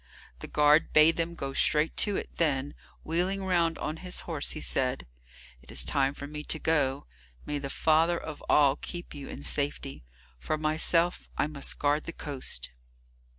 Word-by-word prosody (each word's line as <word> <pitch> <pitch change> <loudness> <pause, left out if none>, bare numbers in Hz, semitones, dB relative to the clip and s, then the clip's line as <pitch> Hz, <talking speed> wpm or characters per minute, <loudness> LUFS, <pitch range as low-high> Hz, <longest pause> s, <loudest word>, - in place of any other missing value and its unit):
The - - -7
guard 150 +1 +3
bade 155 +2 +6
them 170 0 -1
go 135 -3 -5
straight 150 +3 +2
to 205 - +4
it, - - -7
then, 145 -3 0 0.3
wheeling 185 +4 0
round 170 -3 +1
on 155 +1 -4
his 180 +1 -3
horse, 160 -4 -3
he 155 - -6
said, 130 -3 -1 0.6
"It 65 - -20
is - - +1
time 135 0 +1
for 140 - -7
me 150 +1 -7
to 160 - 0
go. 145 -4 0 0.4
May 145 -1 -3
the 140 -1 -5
Father 160 +4 +3
of 155 -3 -8
All 145 -1 +5
keep 175 -1 -7
you 145 -2 -8
in 140 - -8
safety. 140 - -1 0.4
For 155 - -2
myself, 165 +3 +1
I - - +2
must 145 -2 -2
guard 145 +1 +1
the 170 - -6
coast." 130 - -3
150 Hz, 175 wpm, -28 LUFS, 140-165 Hz, 0.6 s, bade